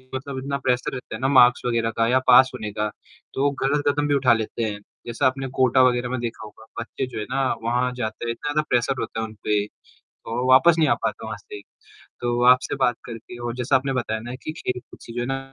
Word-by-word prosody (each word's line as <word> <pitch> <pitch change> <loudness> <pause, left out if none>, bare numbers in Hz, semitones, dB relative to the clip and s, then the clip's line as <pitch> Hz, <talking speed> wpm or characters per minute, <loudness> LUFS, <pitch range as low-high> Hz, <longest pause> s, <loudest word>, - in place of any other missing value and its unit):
मतलब 135 +1 -5
इतना 140 +1 -3
प्रेशर 125 -2 0
रहता 125 -3 -6
है 110 - -8
ना, 130 - +2
मार्क्स 125 -2 +6
वगैरह 115 -2 0
का 115 0 +3
या 130 +2 +3
पास 130 +1 +7
होने 110 -3 -5
का, 105 0 -1 0.4
तो 135 - -1
वो 145 - +3
गलत 145 +2 +1
कदम 145 +1 +1
भी 145 - +2
उठा 130 -4 +4
लेते 115 +1 -2
हैं। 105 -2 -3 0.3
जैसा 120 0 -1
आपने 135 +1 -2
कोटा 130 0 +4
वगैरह 125 -1 +2
में 130 0 -2
देखा 115 -2 -5
होगा, 110 +1 -14 0.2
बच्चे 120 +3 -4
जो 125 - -6
है - - -2
ना 135 +1 0 0.2
वहाँ 125 +2 +1
जाते 110 -1 -4
हैं, - - 0
इतना 145 +5 -1
प्रेशर 125 +2 +1
होता 110 - -4
है - - -1
उन 110 - -12
पे, 105 -1 +1 0.4
तो 120 +3 -5
वापस 160 +7 +7
नहीं 155 -2 +4
आ 120 - +4
पाता 110 0 -3
वहाँ 110 - -5
से। 105 - -10 0.4
तो, 120 0 -3
आपसे 125 +2 +4
बात 125 -3 +1
करके 115 0 -9
और 120 0 -3
जैसा 125 +2 +1
आपने 135 +1 +1
बताया 110 -3 -2
ना 120 +3 -7
कि - - -4
खेल-कूद 125 -1 -5
से 115 - -10
जो 120 - -2
है - - -2
ना 135 0 -2
125 Hz, 245 wpm, -23 LUFS, 115-130 Hz, 0.4 s, पास